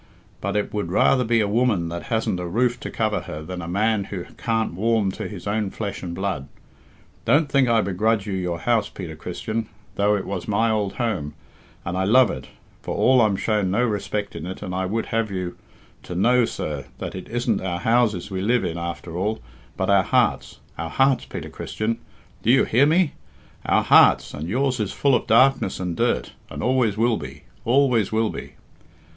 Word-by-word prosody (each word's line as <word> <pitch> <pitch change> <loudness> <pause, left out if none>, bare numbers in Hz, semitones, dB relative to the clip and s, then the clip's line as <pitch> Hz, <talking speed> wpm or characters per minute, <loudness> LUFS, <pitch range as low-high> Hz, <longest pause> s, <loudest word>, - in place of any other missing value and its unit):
But - - -1
I 105 - +2
would 105 -5 -4
rather 125 +6 +4
be 115 -1 +2
a 105 - +1
woman 105 -6 +1
that 85 +1 -6
hasn't 110 -6 0
a 90 - -4
roof 120 +6 +1
to - - -6
cover 110 -3 0
her 85 -3 -7
than 90 +2 -6
a 85 - -6
man 100 +2 +1
that 90 -3 -7
can't 110 -4 -1
warm 105 +1 +1
to - - -5
his 95 -5 -9
own 105 0 -1
flesh 100 0 -5
and 85 -2 -5
blood. 95 -7 -3 0.8
Don't 145 +6 +3
think 135 -3 +3
I 115 -1 +4
begrudge 105 +2 0
you 105 - -3
your 90 -2 -2
house, 115 -4 +1
Peter 85 -5 -7
Christian, 110 +7 -4 0.3
though 105 +1 +3
it 100 - -3
was 95 -2 -4
my 110 +2 +2
old 105 -3 0
home, 95 - -2 0.5
and 85 - -3
I 95 +1 0
love 125 +4 +5
it, 65 - -7 0.3
for - - -4
all 130 -1 +4
I'm 105 -3 +3
shown 105 -1 0
no 115 +6 +2
respect 105 -2 -3
in 80 - -6
it 95 +2 -7
I 95 -1 -2
would 110 +4 -1
have 115 -1 -1
you 90 -2 -4 0.5
to 90 - -7
know, 120 +6 +4
sir, 75 -9 -4
that - - -5
it - - -8
isn't 120 -2 0
our 85 -2 -3
houses 115 -5 +1
we 95 -1 -2
live 115 +4 +2
in 85 +1 -3
after 85 0 -5
all, 105 +5 -1 0.4
but - - +1
our - - +6
hearts - - 0 0.2
our 80 0 -3
hearts, 135 +4 +2
Peter - - -7
Christian 110 +2 -3 0.4
do - - -1
you 135 +2 +6
hear 130 +6 +4
me? 165 0 +3 0.5
our - - +3
hearts, - - +5
and 80 +3 -5
yours 130 +3 0
is 105 -3 -2
full 140 -1 +2
of - - +1
darkness 125 -2 +4
and 90 -2 -3
dirt - - 0 0.2
and - - -6
always 125 -5 +2
will 115 0 +2
be, - - -9 0.2
always 125 -4 +3
will 110 0 +1
be." - - -8
105 Hz, 200 wpm, -23 LUFS, 90-115 Hz, 0.8 s, our